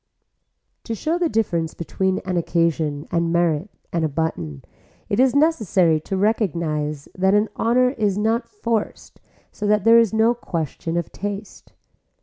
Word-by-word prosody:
To 230 - -3
show 320 - -1
the 345 -2 +1
difference 170 - -1
between 190 +3 -1
an 185 -1 -2
occasion 165 -3 0
and 170 -1 +1
merit 170 +1 +1 0.2
and 170 -1 0
a 155 - +1
button 90 - -3 0.4
it 205 - 0
is 260 +1 +4
necessary 210 - +3
to 190 +5 -4
recognise 165 -8 -1
that 190 +2 +3
an 210 +1 +2
honor 250 +2 +2
is 210 -6 0
not 225 +3 0
forced 230 - -3 0.3
so 210 - -4
that 210 -1 +3
there 230 +2 +7
is 230 -3 +3
no 220 +2 +3
question 165 - -4
of 170 - -3
taste. 205 +1 -7
190 Hz, 150 wpm, -22 LUFS, 165-225 Hz, 0.4 s, there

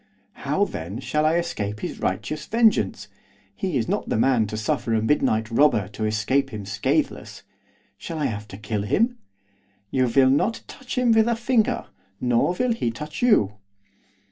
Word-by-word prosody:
'How, - - 0
then, 85 +7 -6
shall 150 +3 0
I 160 - +2
escape 105 -12 -2
his - - -5
righteous 155 0 -3
vengeance? 225 -1 +2 0.5
He 185 -7 -2
is 115 - -1
not - - -2
the - - +1
man 115 -2 +3
to 110 - -5
suffer 110 +1 -1
a 110 - +1
midnight 110 -3 +1
robber 115 -6 +3
to 110 +1 -4
escape 110 +6 +1
him 105 -5 -7
scatheless, 100 - -2 0.6
shall 165 - -6
I 150 - -1
have 105 -1 -3
to 95 - -10
kill 105 0 -3
him?' 230 - +1 0.7
'You 130 -1 +2
will 130 +2 +4
not 210 +11 +1
touch 260 -1 -8
him 250 -2 +3
with 225 0 +4
a 235 - +2
finger, 235 0 +1 0.3
nor 125 +7 +2
will 250 +5 +1
he 175 - -1
touch 150 +7 -7
you. 105 - +3
130 Hz, 170 wpm, -24 LUFS, -, 0.7 s, will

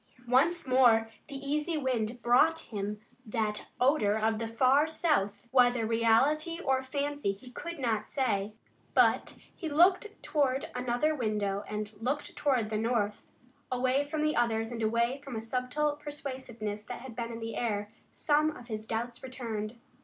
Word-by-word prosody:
Once 300 +8 +3
more 240 -4 +4 0.2
the 280 - -8
easy 300 +4 -1
wind 240 -4 -1
brought 265 +7 +5 0.2
him 205 +1 -3 0.2
that 215 -1 -2
odor 250 -6 +3
of 220 0 +1
the 230 - -2
far 260 +6 +4
south, 295 - 0
whether 245 -3 +4
reality 265 +9 +2
or 265 -6 +1
fancy 285 -3 -2
he 250 +6 -13
could 340 +6 -6
not 225 -5 -1
say. 215 -7 0 0.4
But - - +3 0.2
he 325 - -4
turned 360 +7 +4 0.2
to 275 -3 +1
another 250 +5 +1
window 210 -6 -1
and 210 0 -4
looked 275 +5 -2
toward 250 -7 +1
the 215 - 0
north. 220 -3 -1 0.4
Away 255 +2 +2
from 305 0 -1
the 305 0 +1
others 225 -1 +1
and 230 -1 -4
away 235 +5 +1
from 275 -4 -7
a - - -2
subtle 255 +6 -1
persuasiveness 260 -8 -6
that - - -7
had 255 -3 -9
been 235 -1 -4
in 230 - -6
the 225 0 -5
air, 210 -3 -2 0.2
some 305 0 +1
of 245 0 -13
his 215 0 -5
doubts 235 +1 -3
returned. 230 -4 -5
245 Hz, 160 wpm, -30 LUFS, 220-285 Hz, 0.4 s, brought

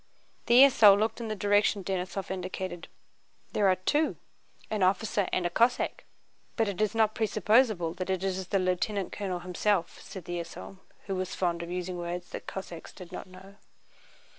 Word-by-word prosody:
The 240 +3 +8
esaul 215 -7 +7
looked 220 +3 -1
in 230 - -4
the 215 - -2
direction 205 0 +2
Denísov 190 0 -3
indicated. 185 -1 -5 0.6
"There 205 - +2
are 185 - +4
two, 295 +12 +1 0.6
an 215 -2 -1
officer 200 +2 +1
and 180 - 0
a - - +2
Cossack. 235 +7 +1 0.5
But 225 -2 +1
it 200 0 -3
is 215 +1 +1
not 220 -1 +3
presupposable 215 -4 +2
that 185 +1 -5
it 190 0 -1
is 190 -1 -2
the 195 - +1
lieutenant 185 +2 -1
colonel 185 -3 -4
himself," 180 0 -1
said 185 -4 -9
the 175 0 -3
esaul, 170 +3 -8 0.3
who 195 - -3
was 185 0 -3
fond 170 -2 -1
of 170 - -6
using 180 0 -4
words 175 +1 -5
the - - -4
Cossacks 180 -4 -8
did 180 -2 -11
not 185 - -7
know. 190 +2 -14
190 Hz, 175 wpm, -29 LUFS, 180-210 Hz, 0.6 s, The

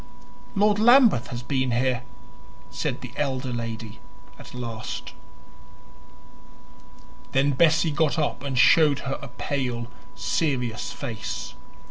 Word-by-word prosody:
"Lord 205 +1 +3
Lambeth 235 - +6
has 120 0 -6
been 130 0 0
here," 125 +1 +1 0.7
said - - -3
the - - -8
elder 130 -3 -2
lady 115 -2 -5 0.4
at - - -12
last. 115 -3 -6 2.2
Then 135 +2 +3
Bessie 160 +3 +3
got 155 +1 +1
up 150 -2 -1
and 135 -2 -3
showed 150 +2 +5
her 135 0 -3
a 140 - -7
pale, 125 -2 -3 0.2
serious 125 -8 -1
face. - - -5
135 Hz, 110 wpm, -25 LUFS, 120-155 Hz, 2.2 s, Lambeth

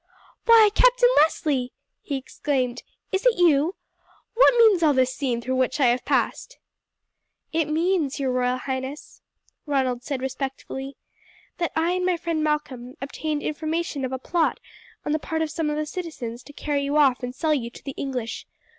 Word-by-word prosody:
"Why, 450 -3 +7
Captain - - +5
Leslie!" 290 -4 +2 0.3
he 285 - -4
exclaimed. 260 -2 -2 0.3
"Is 380 0 0
it 485 - +3
you? 335 0 +3 0.6
What 485 +1 +5
means 435 -6 +6
all 300 -3 +4
this 260 0 +2
scene 250 -5 -2
through 260 +1 -1
which 260 +3 0
I 275 - +4
have 245 +1 0
passed?" - - -1 1.0
"It 325 -1 +2
means, 320 -3 0
your 265 -2 0
royal 250 0 +1
highness," 265 +2 -6 0.5
Ronald 260 -4 0
said 275 +1 -3
respectfully, 270 0 -5 0.6
"that 340 - 0
I 325 +2 +1
and 365 0 -1
my 360 -1 +1
friend 330 -2 -2
Malcolm 275 -5 -2
obtained 295 +2 -3
information 310 -1 -2
of 260 - -2
a 260 - -2
plot 330 +5 0 0.5
on - - -1
the 310 - +1
part 320 +1 -2
of 310 - -4
some 320 -2 -1
of 300 - -2
the 305 - -1
citizens 300 -8 -6
to - - -11
carry 290 -1 -2
you 285 +2 0
off 270 -4 +4
and 250 0 -5
sell 315 +1 +1
you 240 -5 -2
to - - -14
the 275 - -5
English. 250 -4 -4
295 Hz, 175 wpm, -24 LUFS, 260-330 Hz, 1.0 s, Why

